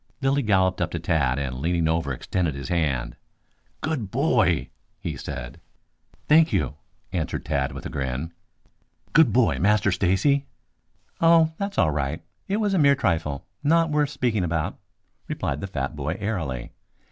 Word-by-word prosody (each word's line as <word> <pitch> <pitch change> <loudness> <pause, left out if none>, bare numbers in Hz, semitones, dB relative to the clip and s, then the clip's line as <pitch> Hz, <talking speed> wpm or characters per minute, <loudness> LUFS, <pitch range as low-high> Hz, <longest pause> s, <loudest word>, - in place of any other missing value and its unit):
Lilly 140 0 +2
galloped 95 -5 +2
up 90 - +1
to 85 - -4
Tad 80 -6 +1
and 65 -3 -3
leaning 85 +2 +1
over 80 -3 0
extended 80 +3 -1
his 70 -1 -6
hand. 70 -8 0 0.7
"Good 140 -10 -2
boy!" 95 - +2 0.3
he - - -4
said. - - -7 0.7
"Thank 160 +2 +6
you," 70 -2 0 0.4
answered 85 -4 -2
Tad 70 0 0
with 70 - -8
a - - -3
grin. 70 +4 -3 0.8
"Good 155 -7 +6
boy, 120 +1 +3
Master 105 -1 +3
Stacy!" 95 +11 +2 0.7
"Oh, 165 -1 +5
that's 200 0 -3
all 80 - +4
right. 75 +2 -2 0.2
It 200 - 0
was 210 -2 +1
a 190 - +3
mere 140 -2 +6
trifle, 80 - -1 0.2
not 165 +2 +3
worth 150 -1 +2
speaking 120 -8 0
about," 85 +2 -2 0.5
replied 70 +2 -3
the - - -3
fat 70 -6 -3
boy 75 +3 -2
airily. 80 - -3
90 Hz, 155 wpm, -25 LUFS, -, 0.8 s, Thank